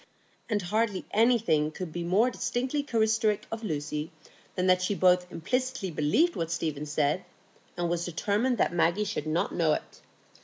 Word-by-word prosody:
And 205 -4 0
hardly 210 +1 0
anything 220 -10 +3
could 160 0 -7
be 175 - -3
more 205 +9 +3
distinctively 250 +4 -1
characteristic 220 -4 +1
of 225 0 -5
Lucy 150 -3 -3 0.4
than 185 - 0
that 185 0 +4
she 190 +2 0
both 180 -1 +3
implicitly 250 +2 -2
believed 160 - +2
what 165 - -2
Stephen 155 -3 -3
said, 150 +4 0 0.5
and 175 -1 0
was 170 0 -1
determined 210 +9 0
that 185 - +1
Maggie 175 +4 +2
should 195 -7 -3
not 170 +5 0
know 165 -3 +2
it. - - -6
185 Hz, 160 wpm, -28 LUFS, 165-225 Hz, 0.5 s, that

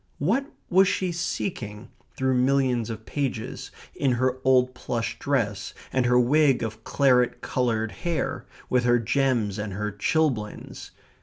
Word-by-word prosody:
What 230 - +1 0.2
was 190 +2 +5
she 185 -1 0
seeking 120 - -4 0.3
through 130 0 +1
millions 125 -2 +2
of 110 -1 -6
pages, 130 -5 -3 0.2
in 135 -3 +1
her 130 +1 0
old 130 -1 +4
plush 115 -2 -3
dress, 105 -8 -1 0.2
and 130 -2 +2
her 125 0 +4
wig 135 0 +3
of 110 0 -5
claret 125 -3 +2
coloured 115 -3 -1
hair, 165 - -3 0.2
with 125 -1 +2
her 120 0 +4
gems 115 -3 0
and 105 -2 -4
her 105 +2 -3
chilblains? 110 0 -1
125 Hz, 140 wpm, -25 LUFS, 110-140 Hz, 0.3 s, was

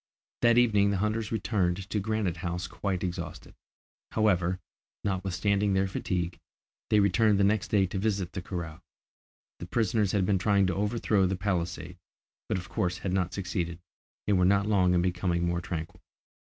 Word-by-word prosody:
That 120 0 +5
evening 105 -4 +4
the 100 - 0
hunters 110 +2 -1
returned 95 -4 0
to 105 - +1
Granite 105 -4 -1
House 90 +1 -3
quite 95 +1 -3
exhausted. 85 -3 -5 0.6
However, 90 -4 +2 0.4
notwithstanding 100 +1 0
their 95 0 +3
fatigue, 90 -2 -3 0.5
they 105 - +4
returned 100 +1 +3
the - - +4
next 105 +1 +2
day 100 -2 +3
to 95 +1 -4
visit 100 -3 -1
the 90 - -4
corral. 85 -3 -6 0.8
The 85 - -7
prisoners 105 -1 +1
had 100 -3 +2
been 95 -1 +2
trying 100 +1 +3
to 90 -2 0
overthrow 105 -1 +1
the 95 - -1
palisade, 90 -3 -3 0.5
but - - +1
of 90 -1 -6
course 90 +1 -1
had 95 -1 -3
not 90 -2 0
succeeded, 90 -3 -3 0.5
and 100 -3 +2
were - - +4
not 100 +2 +4
long 95 -4 +3
in 85 - +3
becoming 90 -1 0
more 85 0 0
tranquil. 80 -2 -6
95 Hz, 165 wpm, -28 LUFS, 90-105 Hz, 0.8 s, That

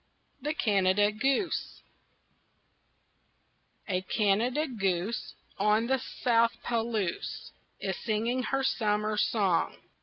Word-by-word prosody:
THE 300 +3 -2
CANADA 205 -3 +3
GOOSE 270 - -1 2.0
A 185 -3 0
Canada 220 +9 +1
goose 195 -3 -2 0.2
On 210 +3 +3
the 265 +2 +1 0.2
South 230 -1 +4
Palouse 225 -5 -2 0.3
Is 190 -3 -2
singing 230 +3 -1
her 270 0 0
summer 215 -3 +1
song. 200 -4 +1
215 Hz, 90 wpm, -29 LUFS, 200-240 Hz, 2.0 s, South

